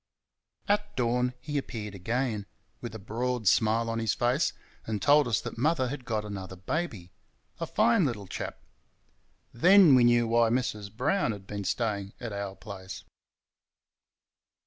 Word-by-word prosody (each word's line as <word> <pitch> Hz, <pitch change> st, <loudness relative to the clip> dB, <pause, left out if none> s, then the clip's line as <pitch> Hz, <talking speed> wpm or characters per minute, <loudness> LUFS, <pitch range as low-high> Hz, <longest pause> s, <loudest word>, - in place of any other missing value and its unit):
At 205 Hz, 0 st, 0 dB
dawn 125 Hz, 0 st, 0 dB
he 145 Hz, +3 st, -2 dB
appeared 105 Hz, -6 st, -6 dB
again, 110 Hz, +1 st, -2 dB, 0.3 s
with 120 Hz, -2 st, -6 dB
a -, -, -4 dB
broad 115 Hz, +2 st, -3 dB
smile 110 Hz, +4 st, +3 dB
on 115 Hz, 0 st, -2 dB
his 115 Hz, -4 st, 0 dB
face, 125 Hz, +6 st, +1 dB, 0.4 s
and 110 Hz, -2 st, -2 dB
told 145 Hz, +2 st, +5 dB
us 115 Hz, -4 st, +1 dB
that -, -, -7 dB
mother 145 Hz, -2 st, +2 dB
had 135 Hz, -2 st, -6 dB
got 110 Hz, -3 st, -2 dB
another 95 Hz, -3 st, -6 dB
baby 95 Hz, -, -4 dB, 0.5 s
a 165 Hz, -, -3 dB
fine 225 Hz, +1 st, +3 dB
little 115 Hz, -8 st, -2 dB
chap. -, -, -5 dB, 1.0 s
Then 180 Hz, +5 st, +7 dB
we 125 Hz, -2 st, +6 dB
knew 120 Hz, -1 st, +4 dB
why 115 Hz, 0 st, +3 dB
Mrs. 110 Hz, -4 st, -2 dB
Brown 130 Hz, -, 0 dB
had 100 Hz, -2 st, -10 dB
been 100 Hz, 0 st, -5 dB
staying 100 Hz, -1 st, -2 dB
at 115 Hz, -4 st, -5 dB
our 100 Hz, -1 st, -4 dB
place. 95 Hz, -1 st, -9 dB
115 Hz, 150 wpm, -28 LUFS, 105-130 Hz, 1.0 s, Then